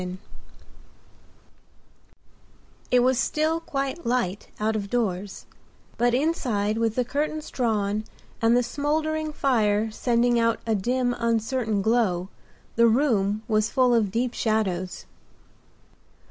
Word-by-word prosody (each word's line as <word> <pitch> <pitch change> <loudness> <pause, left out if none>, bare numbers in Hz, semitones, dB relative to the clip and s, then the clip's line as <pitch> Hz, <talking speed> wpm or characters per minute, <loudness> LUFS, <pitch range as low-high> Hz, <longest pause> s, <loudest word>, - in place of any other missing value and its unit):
THE 180 - -4
KISS 180 +1 -6 2.7
It 250 - +4
was 255 0 +2
still 310 +4 0
quite 275 0 -4
light 230 -5 -1
out 220 +1 0
of 200 -2 -3
doors, 200 -5 -2 0.5
but 240 0 +2
inside 235 -8 0
with 225 -1 0
the 250 - +1
curtains 300 +4 -3
drawn 215 -3 -1 0.4
and 230 +1 +4
the 245 - +2
smouldering 310 +4 -1
fire 220 -6 +1
sending 240 +1 +1
out 230 0 +1
a 225 - +1
dim, 245 +4 0
uncertain 230 -2 0
glow, 195 -6 +1 0.5
the 235 0 +6
room 220 -5 +1
was 215 -1 +1
full 255 -2 +3
of 225 -4 +2
deep 235 +4 -1
shadows. 190 -6 -1
230 Hz, 120 wpm, -25 LUFS, 210-255 Hz, 2.7 s, the